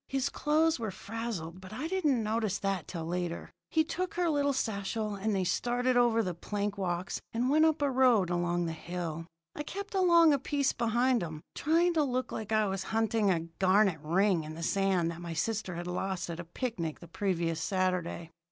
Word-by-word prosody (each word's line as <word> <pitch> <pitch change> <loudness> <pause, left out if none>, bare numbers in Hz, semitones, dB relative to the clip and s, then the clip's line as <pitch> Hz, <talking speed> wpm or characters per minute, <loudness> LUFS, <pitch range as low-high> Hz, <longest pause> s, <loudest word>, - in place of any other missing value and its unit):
His 270 0 0
clothes 310 +1 +2
were 220 -2 -2
frazzled, 195 -4 -5
but 185 +1 -11
I 255 +9 -4
didn't 305 -10 +1
notice 215 -2 0
that 195 -4 -2
till 165 -3 -5
later. 175 0 -3 0.2
He 315 - +3
took 355 +3 -3
her 350 -2 +2
little 285 -1 +2
satchel, 215 -3 -2
and 200 +1 -1
they 190 - +1
started 245 +7 +1
over 235 -2 +4
the 180 -3 -2
plank 205 +4 -3
walks 180 -2 -2
and 245 +3 +1
went 310 +2 +5
up 315 -2 +2
a 280 - +2
road 245 -8 +4
along 175 0 0
the 165 - -2
hill. 165 -1 -5 0.3
I - - -5
kept 400 +7 -6
along 340 -4 +6
a 280 - +2
piece 280 +1 0
behind 240 +1 +2
'em, 155 -3 -6
trying 335 +3 +2
to 315 -2 +3
look 255 -2 -1
like 220 -1 -5
I 215 -1 +3
was 195 -1 -2
hunting 225 -2 +1
a 170 -3 +2 0.2
garnet 190 -2 +4
ring 175 +2 +2
in 155 +1 -7
the 165 - -6
sand 190 -2 +1
that 170 +1 -8
my 170 -1 -5
sister 200 +1 -2
had 175 +1 -5
lost 180 0 -3
at 165 - -6
a 170 - -6
picnic 170 - -4
the 170 - -12
previous 170 -3 -1
Saturday. 180 -3 -1
205 Hz, 200 wpm, -30 LUFS, 175-255 Hz, 0.3 s, along